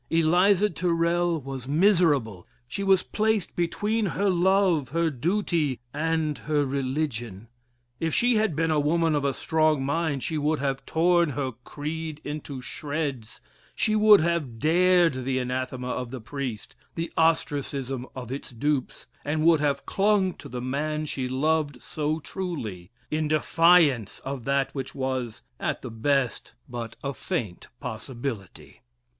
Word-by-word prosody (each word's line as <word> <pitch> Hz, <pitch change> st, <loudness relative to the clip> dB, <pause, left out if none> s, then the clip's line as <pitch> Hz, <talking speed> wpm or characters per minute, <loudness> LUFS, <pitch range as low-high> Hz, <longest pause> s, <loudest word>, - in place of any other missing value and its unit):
Eliza 175 Hz, +5 st, +4 dB
Tyrrel 170 Hz, -1 st, +1 dB
was 135 Hz, -2 st, -7 dB
miserable; 145 Hz, -, +2 dB, 0.2 s
she 200 Hz, -, -4 dB
was 195 Hz, -1 st, +4 dB
placed 215 Hz, -3 st, 0 dB
between 210 Hz, +5 st, 0 dB
her 190 Hz, +5 st, +1 dB
love, 180 Hz, -5 st, +3 dB
her 165 Hz, +2 st, +1 dB
duty, 160 Hz, -, 0 dB
and 155 Hz, -2 st, 0 dB
her 145 Hz, +3 st, 0 dB
religion. 130 Hz, -6 st, -3 dB, 0.5 s
If 165 Hz, 0 st, 0 dB
she 245 Hz, 0 st, +3 dB
had 215 Hz, -7 st, +1 dB
been 165 Hz, +1 st, +1 dB
a 155 Hz, -, +3 dB
woman 165 Hz, +2 st, +2 dB
of 145 Hz, -1 st, +1 dB
a 140 Hz, -, +2 dB
strong 155 Hz, -4 st, +1 dB
mind, 145 Hz, -2 st, -1 dB
she 160 Hz, -2 st, -1 dB
would 150 Hz, +2 st, +1 dB
have 135 Hz, -1 st, -2 dB
torn 170 Hz, 0 st, +3 dB
her 135 Hz, -2 st, -2 dB
creed 155 Hz, +2 st, -5 dB
into 145 Hz, -3 st, -6 dB
shreds, 145 Hz, -5 st, -4 dB, 0.3 s
she 215 Hz, -, +1 dB
would 210 Hz, -2 st, +7 dB
have 160 Hz, -8 st, -1 dB
dared 170 Hz, -1 st, +3 dB
the 130 Hz, 0 st, -1 dB
anathema 125 Hz, 0 st, -3 dB
of 125 Hz, -1 st, -3 dB
the 130 Hz, +1 st, -6 dB
priest 125 Hz, -1 st, -5 dB, 0.2 s
the 165 Hz, 0 st, -4 dB
ostracism 140 Hz, -5 st, 0 dB
of 125 Hz, -2 st, -7 dB
its 135 Hz, -, -5 dB
dupes 135 Hz, +2 st, -2 dB, 0.2 s
and 155 Hz, +2 st, -1 dB
would 165 Hz, -2 st, +6 dB
have 140 Hz, -1 st, 0 dB
clung 195 Hz, -2 st, +2 dB
to -, -, -10 dB
the 125 Hz, 0 st, -5 dB
man 150 Hz, +4 st, -2 dB
she 130 Hz, -3 st, -3 dB
loved 145 Hz, 0 st, 0 dB
so 155 Hz, +3 st, -2 dB
truly, 140 Hz, -, -5 dB, 0.2 s
in 155 Hz, 0 st, 0 dB
defiance 155 Hz, -, +4 dB
of 135 Hz, -3 st, -5 dB
that 140 Hz, 0 st, +1 dB
which 135 Hz, -2 st, -5 dB
was, 130 Hz, -4 st, -3 dB, 0.2 s
at -, -, -2 dB
the 125 Hz, -, -6 dB
best, 125 Hz, +2 st, 0 dB
but 115 Hz, -2 st, -6 dB
a 140 Hz, 0 st, -2 dB
faint 110 Hz, -5 st, -4 dB
possibility. 115 Hz, -3 st, -6 dB
150 Hz, 145 wpm, -26 LUFS, 130-170 Hz, 0.5 s, would